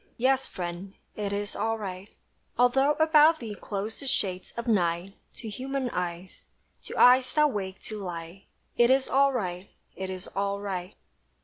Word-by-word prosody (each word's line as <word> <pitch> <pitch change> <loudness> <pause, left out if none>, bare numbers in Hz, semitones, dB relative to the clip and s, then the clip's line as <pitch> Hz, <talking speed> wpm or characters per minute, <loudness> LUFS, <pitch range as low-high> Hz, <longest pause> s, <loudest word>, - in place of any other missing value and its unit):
Yes, 265 +2 +2
friend, 180 +2 -6 0.2
it 205 -1 -3
is 205 0 -3
all 225 +2 0
right, 195 -1 -7 0.5
Although 270 +4 +4
about 315 +1 +5
thee 225 -3 -6
close 205 +1 -5
the 280 - -7
shades 185 -7 -1
of 235 +1 -4
night 180 -3 +1 0.2
To 230 - -8
human 260 +3 -3
eyes. 180 +1 -4 0.4
To - - -7
eyes 255 +1 +6
that 300 -1 +4
wake 190 -4 -4
to 215 -1 -5
light 175 0 -7 0.3
It 240 0 +5
is 265 0 +3
all 275 +1 +4
right 185 -6 -3 0.3
it 190 0 -5
is 185 0 -6
all 200 0 -1
right! 190 -2 -5
205 Hz, 165 wpm, -28 LUFS, 185-255 Hz, 0.5 s, eyes